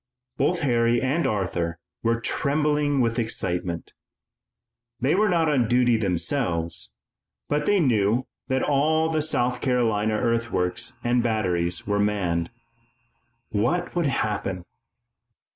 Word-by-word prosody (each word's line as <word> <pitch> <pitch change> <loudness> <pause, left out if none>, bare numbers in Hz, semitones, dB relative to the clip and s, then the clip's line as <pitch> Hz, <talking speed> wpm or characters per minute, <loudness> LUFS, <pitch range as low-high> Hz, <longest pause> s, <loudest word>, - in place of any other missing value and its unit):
Both 180 -1 +1
Harry 120 -3 +2
and 135 +7 0
Arthur 90 -5 -2 0.2
were 115 0 +1
trembling 145 +2 +1
with 115 0 0
excitement. 90 -6 -2 1.1
They 130 +5 +2
were 210 +2 +3
not 170 -3 +2
on 135 -6 +2
duty 120 0 +3
themselves, 90 - 0 0.5
but 150 0 -1
they 205 -1 +4
knew 120 - +2 0.2
that 130 -1 0
all 155 +3 +2
the 155 -1 +1
South 125 -5 0
Carolina 110 -5 +1
earthworks 115 -6 -1
and 120 0 +2
batteries 90 -7 0
were 100 0 0
manned. 90 -5 0 1.0
What 155 - 0
would 170 -3 +1
happen? 100 -7 -2
120 Hz, 115 wpm, -24 LUFS, 100-145 Hz, 1.1 s, they